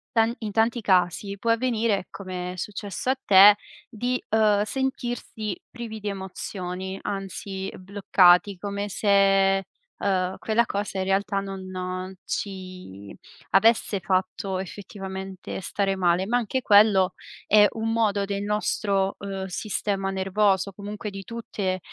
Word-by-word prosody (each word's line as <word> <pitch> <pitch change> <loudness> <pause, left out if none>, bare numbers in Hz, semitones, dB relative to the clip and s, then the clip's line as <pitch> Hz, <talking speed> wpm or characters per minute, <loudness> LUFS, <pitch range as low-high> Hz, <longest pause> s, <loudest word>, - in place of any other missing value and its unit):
Tan 225 +1 +4
in 215 -2 -3
tanti 230 +3 +2
casi 190 +1 +1
può 230 - -2
avvenire, 230 -4 +1
come 180 -2 -5
è - - -9
successo 205 +5 -4
a 265 - +3
te, 200 +1 +9 0.3
di, 245 +2 -2
uhm, 215 -2 +3
sentirsi 240 -4 -3
privi 230 -3 -7
di 210 - -6
emozioni, 190 -1 -5
anzi 195 -1 -5
bloccati, 185 -1 +4
come 200 +1 -4
se, 195 -1 +3 0.3
uhm, 185 -2 0
quella 230 +2 +1
cosa 200 -1 -3
in 190 - -1
realtà 195 +1 +1
non 185 -1 -5
ci 185 - -6 0.4
avesse 210 +1 +4
fatto 185 +1 -1
effettivamente 190 0 -7
stare 195 +1 -1
male. 180 0 +1
Ma 240 +3 +2
anche 245 +2 -1
quello 205 -4 +5 0.3
è 210 0 +7
un 225 0 -2
modo 215 -3 +1
del 200 0 -3
nostro, 200 -2 0
uhm, 195 -1 -5
sistema 195 0 -2
nervoso, 195 0 +1
comunque 205 +2 -6
di 195 0 -8
tutte 200 -4 -3
195 Hz, 130 wpm, -25 LUFS, 190-210 Hz, 0.4 s, te